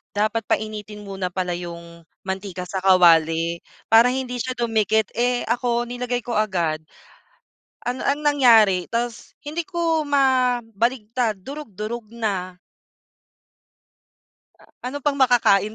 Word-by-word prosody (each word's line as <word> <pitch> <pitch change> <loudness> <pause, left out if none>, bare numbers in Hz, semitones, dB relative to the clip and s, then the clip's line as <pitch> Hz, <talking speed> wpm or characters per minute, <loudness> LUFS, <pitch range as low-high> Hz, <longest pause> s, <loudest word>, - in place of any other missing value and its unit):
Dapat 215 +1 0
painitin 210 -1 -3
muna 195 -2 -4
pala 180 -1 -2
yung 170 -1 -8 0.2
mantika 190 -1 -4
sa 190 +1 -4
kawali 170 -2 +4 0.3
para 230 +2 +7
hindi 250 -1 -3
siya 255 +1 -4
dumikit, 220 -3 +1
eh, 245 +1 0
ako, 240 0 0
nilagay 245 0 -3
ko 240 - -3
agad. 175 -8 0 1.1
Ano 250 +1 -3
ang 285 +1 +1
nangyari 230 -11 +5
ta's 235 0 -3
hindi 310 +4 -4
ko 330 -3 0
mabaligtad, 245 -5 0
durog 280 +2 -8
durog 215 +4 -5
na. 190 -5 -3 2.0
Ah, - - -21 0.2
ano 285 - -5
pang 290 -1 +1
makakain 220 -5 +3
225 Hz, 120 wpm, -22 LUFS, 190-250 Hz, 2.0 s, para